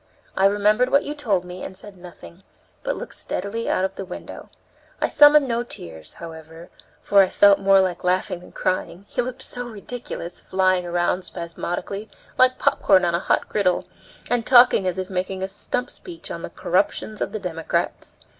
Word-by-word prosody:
I 190 - +3
remembered 210 +5 +2
what 280 +2 +3
you 295 - -4
told 210 -11 -1
me 180 +1 -8
and 190 - -7
said 200 +1 -12
nothing, 175 - -13 0.4
but - - -2
looked - - -7
steadily 200 +5 -3
out 185 - +1
of 190 - -4
the - - -4
window. 180 -1 -9 0.5
I - - +1
summoned 290 -1 +6
no 235 -1 0
tears, 80 - -7
however, 165 0 -11 0.3
for 200 -1 +5
I 190 - +3
felt 200 -1 +5
more 195 0 +5
like 185 -2 0
laughing 180 0 0
than 180 - -15
crying; 185 +1 -2
he 250 - -1
looked 250 +1 -6
so 245 0 -4
ridiculous 215 -5 -7
flying 185 -1 +1
round 175 +1 0
spasmodically, 175 +4 -5 0.3
like 255 0 +4
popcorn 190 -3 +3
on 170 - 0
a 170 - +1
hot - - 0
griddle, 190 -4 0 0.4
and 245 -1 0
talking 240 -6 +6
as 185 - -1
if 185 0 -4
making 185 +1 -3
a - - -1
stump 225 +5 -1
speech 345 -2 -9
on - - -5
the - - -6
corruptions 215 -1 -1
of - - -1
the - - -3
Democrats. 165 -4 -3
190 Hz, 185 wpm, -23 LUFS, 180-230 Hz, 0.5 s, summoned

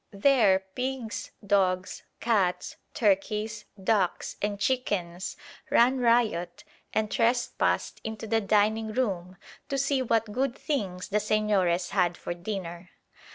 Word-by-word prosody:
There 200 -4 +4
pigs, 255 -2 -3 0.2
dogs, 185 -2 +1 0.2
cats, 200 -6 +1 0.2
turkeys, 210 +1 0 0.2
ducks, 195 -3 +1
and 205 -1 -1
chickens 200 -7 -1 0.3
ran 255 +3 +4
riot 230 -8 +1 0.3
and 215 -1 0
trespassed 240 +1 +1
into 220 0 -5
the 225 0 +1
dining 215 +2 +2
room 190 -7 -2 0.3
to 275 - -1
see 275 0 +1
what 225 -3 +1
good 255 +3 -1
things 190 -11 -3
the 210 - +2
Señores 205 -5 +1
had 180 -3 +1
for - - -4
dinner. 175 -1 -6
210 Hz, 115 wpm, -28 LUFS, 190-230 Hz, 0.3 s, There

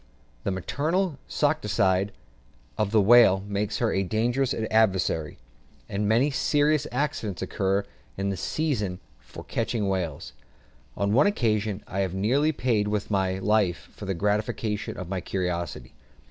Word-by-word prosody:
The - - +1
"maternal 150 - -1
solicitude" 95 +1 +1 0.6
of 105 -2 0
the 110 +1 +4
whale 100 -2 +6
makes 100 0 -1
her - - +1
a 95 - +1
dangerous 120 +7 0
adversary, 100 -8 +1 0.5
and 105 +1 -1
many 125 +7 +3
serious 150 +1 +2
accidents 125 - -2
occur 100 +1 0 0.3
in 100 0 -1
the - - -2
season 105 - -1 0.2
for - - -11
catching 105 -4 -2
whales. 90 -7 -3 0.6
On 100 +1 +1
one 140 - +5
occasion 110 - 0
I 95 - -4
had 95 -2 -1
nearly 130 +11 +2
paid 120 -7 0
with 105 0 -2
my 95 -2 +1
life 100 -3 +1
for - - -9
the 95 -1 -2
gratification 105 +2 -1
of 90 - -6
my 95 0 -3
curiosity. 90 -2 -3
105 Hz, 140 wpm, -26 LUFS, 95-120 Hz, 0.6 s, whale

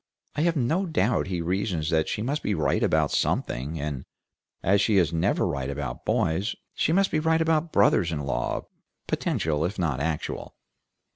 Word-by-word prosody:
I 150 - 0
have 170 +1 +2
no 160 +8 +1
doubt 125 - +1
he 90 -2 -2
reasons 90 -2 -1
that 80 -1 +2
she 105 - -2
must 145 +5 -1
be 105 - 0
right 80 - +1
about - - +2
something, 75 +6 -1
and 70 -3 -3 0.6
as 100 +2 +4
she 105 0 +3
is 85 -3 +3
never 80 - +1
right 70 -1 -2
about 70 -2 -5
boys, 90 +8 0 0.2
she - - +1
must 195 +3 +3
be 155 - +2
right 160 +1 +2
about 160 0 +1
brothers 95 -4 +3
in 75 -3 -2
law, 70 -2 -2 0.4
potential 75 -1 0
if 90 +4 -2
not 80 -8 0
actual. 75 +1 -3
90 Hz, 180 wpm, -26 LUFS, -, 0.6 s, as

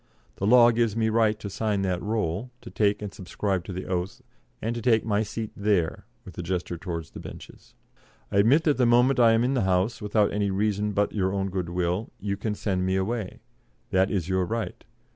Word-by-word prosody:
The 100 - -1
law 120 +1 +7
gives 115 -2 +1
me 110 -1 +2
the - - -1
right 110 -1 +2
to - - -6
sign 100 0 -1
that 90 -2 -1
roll, 105 0 -2
to - - -10
take 105 -1 +1
and 100 - -6
subscribe 95 -1 -3
the 95 -1 -5
oath, 90 0 -3 0.4
and 115 +2 -2
to 120 - -4
take 110 -2 +3
my 105 -1 +1
seat 110 0 -4
there 100 -5 0 0.2
[with 90 - -11
a - - -1
gesture 90 0 -3
towards 85 -2 -6
the - - -9
benches]. - - -12 0.6
I - - 0
admit 125 +11 +5
that 150 -3 +2
the 125 -2 +3
moment 125 +2 +4
I 115 -2 +6
am 115 +1 +3
in 130 +2 +1
the 130 - +1
House, 95 +5 +1
without 105 0 +1
any 100 -1 0
reason 105 +1 0
but 100 +1 +1
your 95 -3 0
own 95 -1 -2
good 90 -2 -3
will, 90 +4 -1
you 100 0 -2
can 105 +1 -3
send 95 -3 -1
me 95 0 +1
away. 100 +1 -2 0.5
That 95 +1 +3
is 90 -5 -1
your 95 0 +1
right. 115 +3 -4
100 Hz, 220 wpm, -26 LUFS, 95-115 Hz, 0.6 s, law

